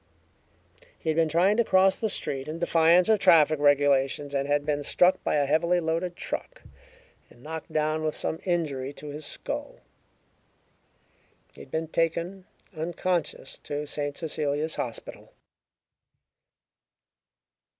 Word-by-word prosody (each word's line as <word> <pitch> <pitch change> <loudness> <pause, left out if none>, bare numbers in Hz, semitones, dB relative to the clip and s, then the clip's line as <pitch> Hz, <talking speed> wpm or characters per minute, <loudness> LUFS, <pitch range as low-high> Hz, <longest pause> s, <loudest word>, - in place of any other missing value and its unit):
He 160 - -4
had - - -2
been 165 -1 +2
trying 180 +7 +3
to 235 - +4
cross 190 -2 +4
the 220 - -2
street 135 -7 -2
in 155 +2 -5
defiance 170 +1 +4
of 220 -2 +4
traffic 155 -5 +5
regulations, 145 0 +2
and 140 0 -1
had 145 0 +1
been 145 -1 0
struck 180 +5 +2
by - - 0
a 145 -1 +2
heavily 170 +5 +2
loaded 170 +2 -2
truck - - -6 0.7
and 120 - -19
knocked 160 +1 -7
down, 155 0 0
with 155 -1 -1
some 160 - -3
injury 145 -7 -2
to 150 +1 -9
his 150 +1 -6
skull. - - -5 1.8
He - - -13
had - - -13
been 160 +3 -2
taken, 170 +3 -1 0.3
unconscious, 175 +1 -3
to 145 +1 -5
St. 145 -1 -3
Cecilia's 155 -1 -2
Hospital. 120 -2 -6
155 Hz, 135 wpm, -27 LUFS, 145-170 Hz, 1.8 s, traffic